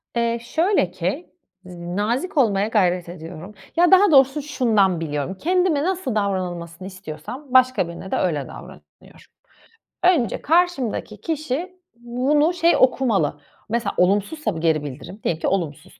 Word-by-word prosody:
Eee, 235 0 0
şöyle 320 - +1
ki, 185 - -3 0.4
z 180 - -10 0.2
nazik 245 - -1
olmaya 205 -6 +3
gayret 180 -5 +1
ediyorum. 175 +3 -9 0.2
Ya, 350 +2 +4
daha 380 0 +6
doğrusu 270 +1 +5
şundan 220 - +1
biliyorum, 150 +3 -3
kendime 355 - +1
nasıl 355 - -2
davranılmasını 185 -3 -3
istiyorsam 185 - -8
başka 255 -7 +4
birine 170 +3 -9
de - - +1
öyle 150 -6 -1
davranıyorum. - - -14 0.8
Önce 330 - +2
karşımdaki 290 - 0
kişi 325 +3 -3 0.2
bunu 260 +7 +1
şey, 340 0 +3
okumalı, 220 - +2 0.3
mesela, 235 +2 -1
olumsuzsa 205 - +1
bu 160 - -4
geri 160 -2 +1
bildirim, 145 +8 -8
diyelim 165 -1 -1
ki - - 0
olumsuz. 170 -2 -3
225 Hz, 135 wpm, -22 LUFS, 180-295 Hz, 0.8 s, daha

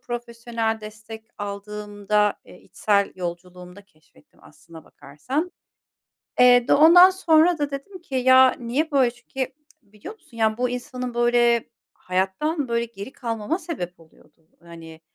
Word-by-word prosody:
profesyonel 235 -2 -4
destek 220 +1 -11
aldığımda, 205 0 -2
eee, 180 - -16
içsel 200 -2 0
yolculuğumda 180 +2 -8
keşfettim 155 -4 -28
aslına 165 -2 -16
bakarsan. 260 - -5 0.9
Eee, 245 0 +6
d - - +4
ondan 350 +5 +8
sonra 340 -2 +3
da 290 -1 -3
dedim 340 +7 -8
ki 270 -5 -8
ya, 260 0 +5
niye 265 +7 -2
böyle? 265 -4 +3
Çünkü 255 +2 -6 0.3
biliyor 210 - -12
musun, 235 - -19
yani, 220 0 +1
bu 250 0 0
insanın, 250 0 -6
böyle, 240 -1 +2 0.2
hayattan, 195 - -2
böyle, 235 0 -1
geri 225 +1 -10
kalmama 230 - -4
sebep 180 - -7
oluyordu. 160 0 -24
Hani, 165 -1 -13
235 Hz, 130 wpm, -23 LUFS, 200-260 Hz, 0.9 s, ondan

